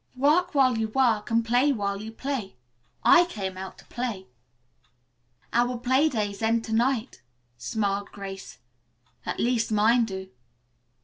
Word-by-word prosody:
"'Work 300 +6 +2
while 255 -4 +4
you 220 - 0
work 225 -2 +1
and 230 0 +2
play 245 +5 +3
while 200 -5 -2
you 220 +1 -7
play.' 245 - -4 0.5
I 350 -1 +7
came 195 - -5
out 190 0 -8
to - - -16
play." 230 -6 -4 1.3
"Our 245 +1 +2
play 260 +5 +2
days 205 -5 -3
end 225 +1 +1
to 220 - -5
night," 240 - 0 0.4
smiled 200 - -2
Grace. 195 -1 -8 0.7
"At - - -3
least 235 -2 +1
mine 225 +3 +4
do." 190 -3 -7
225 Hz, 140 wpm, -26 LUFS, 205-255 Hz, 1.3 s, I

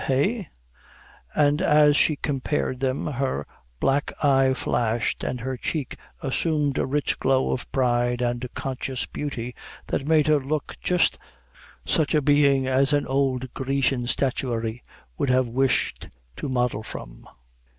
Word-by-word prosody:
eh," 190 - +1 0.9
and 150 +1 +3
as 150 -3 +5
she 155 - +4
compared 135 -2 -2
them 130 0 -1
her 130 - -2 0.3
black 140 +2 +1
eye 135 -1 +4
flashed, 120 -2 -1
and 125 - -2
her 130 +2 -3
cheek 135 +2 -3 0.3
assumed 145 +1 0
a - - 0
rich 145 +2 0
glow 130 0 +2
of 125 - -4
pride 120 -2 +1
and 120 0 -1
conscious 130 -1 -3
beauty, 125 -4 -5 0.3
that 140 - -2
made 155 -2 +4
her 155 -1 +4
look 140 +2 -3
just 180 -1 +2 0.7
such 155 0 +1
a 150 - +4
being 140 -2 +4
as 135 +2 +2
an 145 -1 +2
old 130 -2 0
Grecian 135 -2 0
statuary 120 -3 -1 0.4
would 140 - +1
have 130 0 +3
wished 125 - 0 0.3
to 145 - -4
model 125 -4 0
from. - - -9
135 Hz, 140 wpm, -25 LUFS, 125-145 Hz, 0.9 s, as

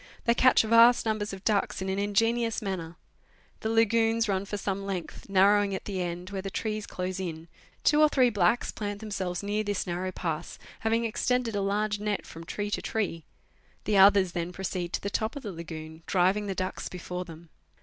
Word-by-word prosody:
They 235 - +4
catch 255 0 +5
vast 230 +2 +6
numbers 215 -1 -1
of 195 0 -8
ducks 205 -3 +1
in 190 - -3
an 190 +1 -1
ingeni 225 +4 +2
ous 225 - -2
manner. 180 -5 -4 0.6
The 220 - -2
lagoons 225 0 +3
run 195 -1 0
for 205 - -4
some 195 0 -3
length, 195 -1 -5
narrowing 200 +1 +4
at - - -6
the 190 -3 -3
end, 175 +2 -4
where 195 -1 -3
the 195 - -5
trees 215 +1 -3
close 185 +1 -4
in; 165 -3 -5 0.4
two 300 0 +4
or 305 - +6
three 255 -4 +3
blacks 205 +3 +2
plant 205 -1 -4
themselves 195 -4 -3
near 210 +1 -1
this 205 -2 -2
narrow 180 +1 -3
pass, 165 -4 -4 0.2
having 225 +1 +1
extended 235 0 0
a 200 - 0
large 205 +1 0
net 210 -1 -2
from 165 +1 -10
tree 205 +4 -4
to - - -1
tree; 185 -7 -2 0.6
the 210 - 0
others 195 -1 +6
then 170 0 -3
proceed 180 -2 -4
to - - -1
the 200 - -2
top 220 +6 -1
of 285 - -7
the 210 - -4
lagoon, 160 -1 -8
driving 190 +3 +2
the 195 - -2
ducks 185 +1 -3
before 180 0 -5
them. 165 -1 -12
200 Hz, 200 wpm, -28 LUFS, 180-215 Hz, 0.6 s, vast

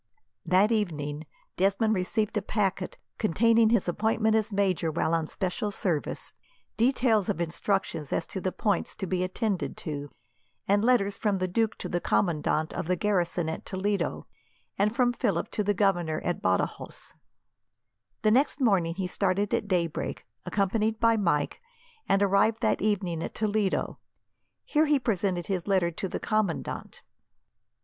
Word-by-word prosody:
That 190 +5 +4
evening, 155 -8 -2 0.3
Desmond 200 +4 +2
received 210 +3 -1
a 210 - +1
packet 195 -2 -1 0.2
containing 225 +3 +4
his 230 -5 +2
appointment 220 +4 +1
as 220 0 +1
major 190 -5 +1
while 160 +1 0
on 165 -2 +1
special 190 +5 -2
service, 175 -6 -2 0.4
details 230 -4 +2
of - - -1
instructions 170 -2 -1
as 165 - 0
to 190 - -6
the 185 - -1
points 205 +1 -1
to 195 - -4
be 185 0 -1
attended 190 +1 -2
to, 145 -3 -5 0.6
and 205 +1 +3
letters 215 -5 +2
from 205 -3 0
the 185 0 -1
duke 220 +4 0
to - - -5
the 175 - -2
commandant 155 -3 0
of - - -4
the 180 - +2
garrison 180 -3 0
at 160 - -4
Toledo, 200 +1 -2 0.5
and 210 +3 +1
from 245 -1 +3
Philip 200 -8 -1
to 210 - -1
the 205 0 +1
Governor 175 -6 +1
at 175 - -1
Badajos. 95 0 -2 1.1
The 215 - +4
next 275 +5 +2
morning 190 -10 +2
he 190 0 -2
started 195 +2 0
at - - 0
daybreak, 175 -4 -2 0.2
accompanied 210 +4 0
by 230 0 +4
Mike, 170 -9 0 0.5
and 195 +1 +4
arrived 200 +3 +3
that 220 - +2
evening 190 -5 0
at - - -5
Toledo. 210 -2 0 0.7
Here 310 0 +2
he 295 -1 +4
presented 195 -8 -1
his 185 -3 -3
letter 185 -4 +2
to 190 +3 -4
the - - -3
commandant. 215 -6 -2
195 Hz, 155 wpm, -28 LUFS, 175-215 Hz, 1.1 s, That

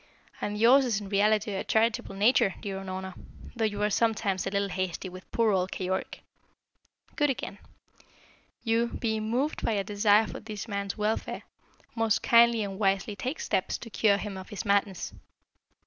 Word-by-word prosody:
And 205 0 -2
yours 245 +6 +6
is 230 -6 0
in 200 -2 -8
reality 210 +1 +2
a 190 - -2
charitable 220 -3 +1
nature, 205 -1 +3
dear 195 -3 -5
Unorna, 190 0 -6 0.4
though 225 -1 +1
you 205 -1 -1
are 210 - +1
sometimes 205 -4 +1
a - - +1
little 200 0 -1
hasty 185 0 -3
with 185 +1 -12
poor 230 -2 +2
old 185 -1 0
Keyork. 190 0 -3 0.9
Good 295 -1 +2
again. 220 -6 -4 1.0
You, 230 0 +2
being 220 -2 -2
moved 265 +6 -1
by 225 - +1
a 200 -2 0
desire 205 +2 +3
for - - -7
this 215 0 -7
man's 200 -1 -3
welfare, 215 +1 -2 0.5
most 225 -2 +1
kindly 235 -1 +5
and 195 -1 -5
wisely 195 0 +1
take 255 - -4
steps 185 - -1
to 230 - -10
cure 205 -2 +3
him 200 -1 -5
of 185 - -9
his 210 0 -5
madness. 200 -2 0
210 Hz, 170 wpm, -28 LUFS, 195-225 Hz, 1.0 s, yours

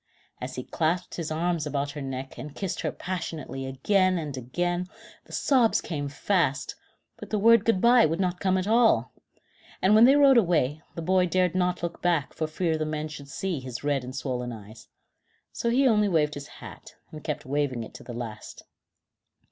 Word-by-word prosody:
As 130 +1 -5
he 130 - -4
clasped 170 +5 -1
his 165 -3 -4
arms 165 0 -1
about 145 -1 -2
her 145 0 -7
neck, 135 0 -5
and 145 +4 -8
kissed 195 -3 -3
her - - -1
passionately 160 -7 -5
again 185 +8 +2
and 150 -4 -4
again, 175 +8 -2 0.4
the - - -17
sobs 250 -5 +3
came 145 -4 -4
fast, 150 -2 0 0.4
but - - -10
the 215 - 0
word 230 +1 +6
Good 225 -5 +3
bye 235 0 +6
would 165 +3 -2
not 180 -1 -1
come 190 -1 +1
at 185 - -1
all, 230 +1 +3 0.7
and 190 +3 +3
when 220 +2 +8
they 270 +3 +6
rode 275 -3 +7
away, 155 - +1
the 165 - -5
boy 185 +1 +3
dared 180 0 +1
not 180 -1 0
look 170 0 -4
back 170 -5 +1
for 155 - -2
fear 160 0 -1
the - - 0
men 155 0 -3
should 140 -2 -10
see 180 +2 -3
his 125 -1 -7
red 145 -3 0
and 130 +1 -7
swollen 125 -2 -3
eyes. 110 0 -11 0.6
So 235 - -2
he 265 +3 +3
only 210 -3 +3
waved 150 -4 +2
his 145 -1 -7
hat, - - -12 0.2
and 155 -1 -9
kept 150 - -4
waving 135 -3 -1
it - - -11
to - - -11
the - - -9
last. 115 -3 -7
160 Hz, 195 wpm, -26 LUFS, 140-185 Hz, 0.7 s, when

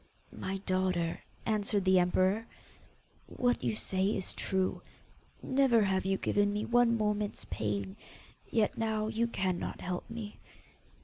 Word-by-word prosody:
'My 195 +1 -4
daughter,' 185 -3 0 0.2
answered 205 -2 +1
the 185 0 +5
emperor, 185 +5 +2 0.8
'what 245 - 0
you 115 -3 0
say 185 - +1
is 195 -3 0
true. 190 -1 -1 0.6
Never 260 -4 +4
have 190 -1 +1
you 195 0 +1
given 205 +1 +1
me 210 +1 -2
one 240 -1 +4
moment's 210 -1 -1
pain. 100 -2 -2 0.5
Yet 220 -2 +1
now 220 -1 0
you 225 +1 0
cannot 190 -5 -2
help 180 +3 -4
me. 225 -2 -7
205 Hz, 130 wpm, -31 LUFS, 185-220 Hz, 0.8 s, the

